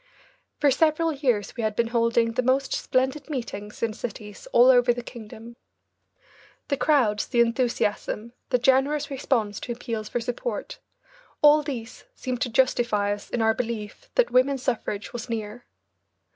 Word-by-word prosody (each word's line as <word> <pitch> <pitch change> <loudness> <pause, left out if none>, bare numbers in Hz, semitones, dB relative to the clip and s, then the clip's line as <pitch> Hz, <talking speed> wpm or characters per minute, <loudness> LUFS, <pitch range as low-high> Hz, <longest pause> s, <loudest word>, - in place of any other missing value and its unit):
For 290 -3 +4
several 320 +3 +2
years 245 -8 0
we 240 - -3
had 215 -1 -1
been 230 +1 +1
holding 230 -1 +2
the 245 - 0
most 260 +2 +1
splendid 265 +3 -1
meetings 220 -7 -5
in 225 -2 0
cities 210 -2 -8
all 245 +2 +7
over 245 -1 +5
the 245 - -5
kingdom. 230 0 -11 1.1
The 280 - +1
crowds, 250 -10 +2
the 240 - 0
enthusiasm, 235 -1 0 0.2
the 250 - +3
generous 270 +4 +2
response 235 -6 -1
to - - -6
appeals 230 -3 -5
for 240 - -1
support, 245 - -4 0.6
all 300 +1 +7
these 250 -5 -7
seemed 250 -1 -4
to 245 - 0
justify 235 -4 +2
us 205 - -9
in 235 - -1
our 220 0 +4
belief 230 - -5
that - - +3
women's 260 +1 +2
suffrage 215 -4 -3
was 240 +1 -6
near. 225 +1 -5
240 Hz, 155 wpm, -25 LUFS, 225-265 Hz, 1.1 s, all